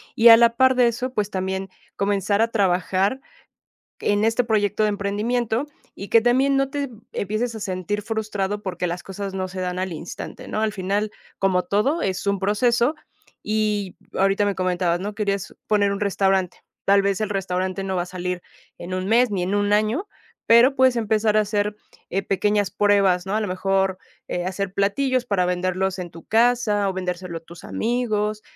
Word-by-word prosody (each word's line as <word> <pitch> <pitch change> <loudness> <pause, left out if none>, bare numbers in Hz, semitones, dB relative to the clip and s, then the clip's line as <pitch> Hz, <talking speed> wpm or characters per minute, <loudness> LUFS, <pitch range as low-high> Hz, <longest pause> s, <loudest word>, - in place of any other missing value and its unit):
Y 235 +1 +7
a 225 - +11
la 235 0 +4
parte 260 -1 +4
de 240 - +5
eso, 250 +2 -2
pues, 210 -4 -1
también 190 0 -3 0.3
comenzar 200 +1 +1
a 225 - +4
trabajar, 190 +2 +1 0.9
en 205 +1 +2
este 225 +2 +2
proyecto 215 -2 +1
de 215 - +3
emprendimiento, 220 +4 -1 0.3
y 200 - -8
que 230 - +5
también 260 +4 +3
no 275 0 +1
te 280 -1 -3 0.2
empieces 215 +4 -2
a 220 - -6
sentir 195 +2 -3
frustrado, 210 -2 -2
porque 180 -3 -3
las 175 +1 -5
cosas 195 0 -5
no 190 -1 -2
se 185 0 -7
dan 180 0 -2
al 185 -1 -2
instante, 165 +1 -8
¿no? 215 - -2
Al 220 -1 0
final, 200 +2 -1 0.3
como 185 -2 +2
todo, 270 +12 0
es 190 +1 -2
un 200 -1 +1
proceso 235 +7 +2 0.5
y 210 -3 -1 0.2
ahorita 195 +1 +2
me 200 -1 -1
comentabas, 180 -2 0
¿no?, 205 +3 -5
querías 200 -2 -2
poner 205 -1 +3
un 200 - -4
restaurante. 195 -2 +1 0.3
Tal 200 0 +5
vez, 200 0 0
el 215 - 0
restaurante 190 -1 -2
no 190 - -2
va 180 - 0
a - - -7
salir 180 0 -4 0.3
en 175 +2 -8
1 185 0 -2
mes 235 +3 +4
ni, 195 -3 -1
en 190 +3 -1
1 205 0 +1
año, 220 - +1 0.4
pero 240 +4 +6
puedes 260 -2 +4
empezar 215 -1 +1
a - - +6
hacer, 210 0 -1 0.3
eh, 195 +2 0
pequeñas 205 0 +1
pruebas, 195 -3 +3
¿no? 195 +2 -2
A - - +1
lo 215 - -1
mejor, 190 0 0 0.3
eh, 175 0 -3
hacer 190 0 -3
platillos 250 +6 +1
para 190 -5 +1
venderlos 185 +1 -1
en 175 -2 -6
tu 165 -1 -13
casa 225 -3 +2
o - - -1
vendérselo 180 -2 -4
a - - -21
tus 165 +1 -14
amigos, 215 -3 -1
200 Hz, 190 wpm, -23 LUFS, 190-220 Hz, 0.9 s, a